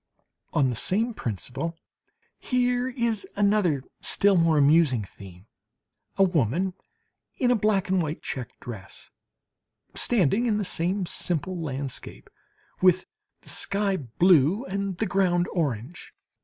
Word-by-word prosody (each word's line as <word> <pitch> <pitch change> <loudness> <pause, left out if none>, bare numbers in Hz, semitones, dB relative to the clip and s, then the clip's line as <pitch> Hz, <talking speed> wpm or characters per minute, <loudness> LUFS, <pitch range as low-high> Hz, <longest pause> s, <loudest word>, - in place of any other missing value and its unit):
On 135 -3 +2
the - - -4
same 225 - +2
principle, 135 - -5 0.6
here 250 0 0
is 235 -4 -2
another 200 -9 +2 0.2
still 200 -1 +4
more 165 -3 +3
amusing 145 -5 +4
theme: 95 -1 -13 0.7
a 195 - +5
woman 175 - +1 0.6
in 245 -2 +2
a - - +4
black 210 -3 +1
and 190 -1 +2
white 155 0 -4
check 125 -4 -6
dress, 100 -5 -10 0.8
standing 225 - +3
in 215 -2 +1
the 210 - -1
same 180 +3 -1
simple 175 +1 -2
landscape, 140 -5 -5 0.5
with 185 0 +4 0.4
the - - -12
sky 200 -1 0
blue, 170 - +3
and 195 -4 -3
the 220 - 0
ground 180 -3 +1
orange. 145 - -4
180 Hz, 125 wpm, -26 LUFS, 140-200 Hz, 0.8 s, a